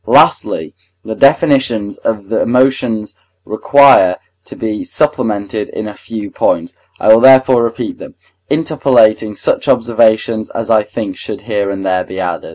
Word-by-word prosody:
Lastly, - - +2 0.3
the 110 - -5
definitions 135 -6 +1
of 100 -3 -4
the 115 - -1
emotions 125 -3 0 0.3
require 110 -5 +4 0.3
to - - -11
be 110 -1 -4
supplemented 110 -8 -2
in 110 - -6
a 105 - -8
few 105 -1 -8
points; 85 +1 -1 0.3
I 110 - +5
will 115 - +4
therefore 130 -1 +5
repeat 115 +1 -4
them, - - -12 0.3
interpolating 130 -8 +1
such - - -2
observations 110 -1 +1
as 115 0 -3
I 110 -1 +4
think 105 -2 -6
should 105 - -7
here 105 -3 -3
and 95 -1 -5
there 95 -1 0
be 95 - -9
added. 90 -2 -4
110 Hz, 150 wpm, -14 LUFS, 105-125 Hz, 0.3 s, I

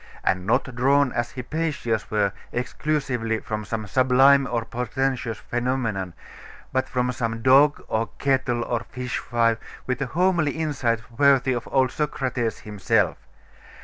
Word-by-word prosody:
And 90 0 0
not 120 +3 +1
drawn, 135 +2 +3
as 120 -1 -2
Hypatia's 130 -4 -2
were, 105 -2 +1 0.2
exclusively 125 -3 -1
from 105 -1 -4
some 110 +1 -4
sublime 130 +3 +4
or 115 -2 -1
portentous 125 0 -2
phenomenon, 120 -7 -2 0.6
but 130 0 0
from 125 -1 0
some 115 -2 -3
dog, 140 +3 +5
or 110 +1 -1
kettle, 130 -3 +1
or 120 -1 -1
fishwife, 120 -3 -1 0.3
with 130 +1 -2
a 135 - 0
homely 170 0 +1
insight 135 -8 -1 0.2
worthy 135 -2 +4
of 120 -1 -4
old 130 -2 +3
Socrates 130 -6 -2
himself. 105 -2 0
125 Hz, 130 wpm, -24 LUFS, 115-135 Hz, 0.6 s, dog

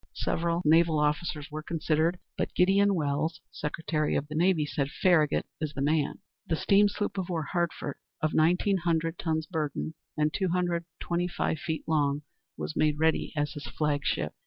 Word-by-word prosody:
Several 170 +1 0
naval 160 +1 +5
officers 150 0 -1
were 155 +1 -4
considered, 160 +2 0 0.2
but - - -3
Gideon 195 +2 +4
Welles, 155 +1 -1
Secretary 150 0 -1
of 145 - -1
the - - -5
Navy, 165 -1 +3
said, 140 -1 -1
"Farragut 155 -3 +3
is 155 -2 -3
the 135 - -3
man." 150 0 +1 0.3
The 165 - +1
steam 200 +5 +4
sloop 205 -1 -2
of 185 -1 -3
war, 165 -3 -1
Hartford, 165 -3 -2 0.2
of 155 - 0
nineteen 180 +5 +3
hundred 165 -1 0
tons 160 -1 -1
burden, 155 -1 -3 0.2
and 150 +1 +1
two 190 -2 0
hundred 175 -1 0
twenty 175 +1 -1
five 160 -2 -1
feet 160 -1 -3
long, 145 -2 +1 0.3
was - - -4
made 150 -1 +2
ready 160 +1 +1
as 145 0 0
his 145 -4 -7
flag 145 +2 -1
ship. 75 - -1
160 Hz, 175 wpm, -29 LUFS, 150-175 Hz, 0.3 s, naval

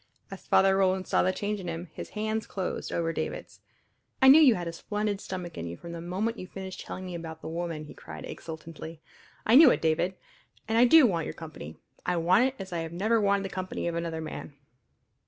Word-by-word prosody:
As 195 - -10
Father 195 0 +5
Roland 190 -1 +2
saw - - +3
the 185 - +2
change 205 +2 -3
in 180 - -7
him 165 0 -5
his - - -7
hands 220 +1 -1
closed 190 -2 -4
over 165 -1 -1
David's. - - -5 0.6
"I 265 - +7
knew 300 +4 +9
you 260 -7 +7
had 175 -1 -4
a 165 - -4
splendid 210 +2 -2
stomach 180 -3 -6
in 85 - -4
you 85 +1 -6
from 170 - -9
the 170 -1 -6
moment 200 +7 -2
you 185 - -7
finished 190 -1 -7
telling 185 - -7
me 180 - -6
about 165 -1 -7
the - - -7
woman," 165 -1 -4
he - - -11
cried 80 -1 -9
exultantly. 160 0 -8 0.5
"I 220 - +3
knew 290 +2 +10
it, - - +2
David. 165 +3 +1 0.5
And 225 +1 +2
I 245 - +8
do 310 +3 +8
want 170 -8 0
your - - -6
company 155 - -9 0.3
I 180 -1 0
want 180 +8 +4
it 265 +1 -1
as 190 -4 -7
I 165 -1 -2
never 210 +7 +1
wanted 200 -1 +2
the - - -3
company 185 -2 -4
of 170 - -1
another 165 -1 -3
man!" 155 -2 -7
180 Hz, 225 wpm, -28 LUFS, 165-205 Hz, 0.6 s, knew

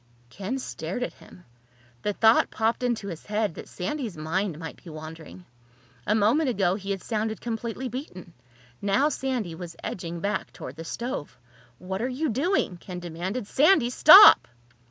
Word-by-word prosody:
Ken 205 - -4
stared 195 -3 -5
at - - -4
him. 180 - -17 0.6
The 210 - -1
thought 220 +2 +4
popped 225 +2 0
into 235 -5 -1
his 165 -3 -9
head 210 -3 -1
that - - -10
Sandy's 215 - -4
mind 165 +2 -2
might 160 0 -9
be 175 - -10
wandering. 160 +3 -10 0.6
A 210 - +3
moment 240 +8 +3
ago 195 -6 +1
he 195 0 -6
had 195 -2 -3
sounded 220 -1 -2
completely 235 +2 -4
beaten. 215 - -8 0.5
Now 205 +9 +2
Sandy 255 - -3
was 170 0 -8
edging 170 -2 -5
back 200 +2 -2
toward 130 - -9
the 165 - -8
stove. 235 - -5 0.4
"What 190 - -5
are 250 - -1
you 285 +4 -2
doing?" 270 - 0
Ken 180 +1 -8
demanded. 180 +7 -4
"Sandy, 275 - +3
stop!" 375 +11 +9
205 Hz, 160 wpm, -26 LUFS, 175-245 Hz, 0.6 s, stop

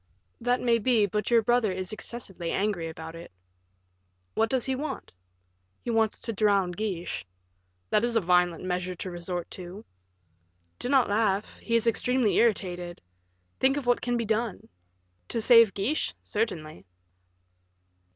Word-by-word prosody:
"That 245 +1 +1
may 235 -1 +3
be, 225 -2 +3
but 210 +1 -2
your 235 -2 +4
brother 240 -2 +2
is 185 +1 -4
excessively 200 -6 -5
angry 195 -4 -1
about 160 0 -8
it." 165 +1 -10 1.0
"What 225 0 +1
does 260 -1 +1
he 265 - 0
want?" 290 +4 -5 0.7
"He 240 - -2
wants 225 -2 +2
to 230 - -4
drown 200 -3 +2
Guiche." 180 - -3 0.7
"That 210 - +3
is 240 -1 0
a - - +5
violent 180 -2 +2
measure 180 0 -2
to 185 +1 -6
resort 175 0 -5
to." 185 +4 -7 0.9
"Do 245 - -3
not 270 -2 +4
laugh; 205 -1 0
he 230 - -1
is 230 0 +3
extremely 235 0 +2
irritated. 180 -6 0 0.6
Think 270 +2 +3
of 285 - -3
what 245 0 +2
can 245 -1 0
be 230 - -1
done." 220 -1 -2 0.6
"To - - -1
save 230 -3 +6
Guiche 225 +11 -1
certainly." 160 - -3
215 Hz, 150 wpm, -27 LUFS, 180-235 Hz, 1.0 s, save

